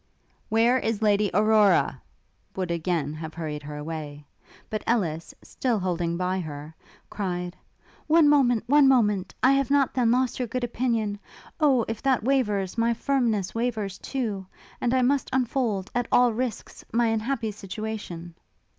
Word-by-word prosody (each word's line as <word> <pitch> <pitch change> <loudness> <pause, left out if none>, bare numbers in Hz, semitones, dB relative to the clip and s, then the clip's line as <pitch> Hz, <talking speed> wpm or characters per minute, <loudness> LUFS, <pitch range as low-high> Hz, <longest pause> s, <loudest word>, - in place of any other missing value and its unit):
'Where 235 +3 +3
is 225 -2 -2
Lady 205 -1 +3
Aurora?' 210 +1 +3 0.5
would 185 -2 -2
again 165 -3 -1
have 155 0 -7
hurried 155 -3 -4
her 150 +1 -8
away; 150 -1 -6 0.4
but 215 - -4
Ellis, 170 -9 0
still 245 -4 -1
holding 175 -3 -1
by 185 +1 -1
her, 150 -2 -7 0.4
cried, 180 -3 -3 0.5
'One 315 0 +5
moment! 255 -6 +4
one 285 +2 +5
moment! 210 -8 +2
I 260 - +6
have 275 -1 +2
not, 280 -1 +3
then, 245 -3 +2
lost 250 +1 +1
your 250 - -1
good 250 +3 -3
opinion? 230 -4 -1 0.4
Oh! 270 -7 +3
if 225 -1 -4
that 260 -5 +1
wavers, 215 -6 0
my 230 0 +2
firmness 230 -7 0
wavers 225 -5 -2
too! 215 -8 -3 0.3
and 240 - +1
I 255 - +3
must 275 +1 +1
unfold 240 -6 -1
at 245 -1 -1
all 245 -2 +5
risks 245 0 -4
my 235 +1 +2
unhappy 225 +1 -1
situation!' 200 -4 -6
220 Hz, 150 wpm, -26 LUFS, 185-250 Hz, 0.5 s, I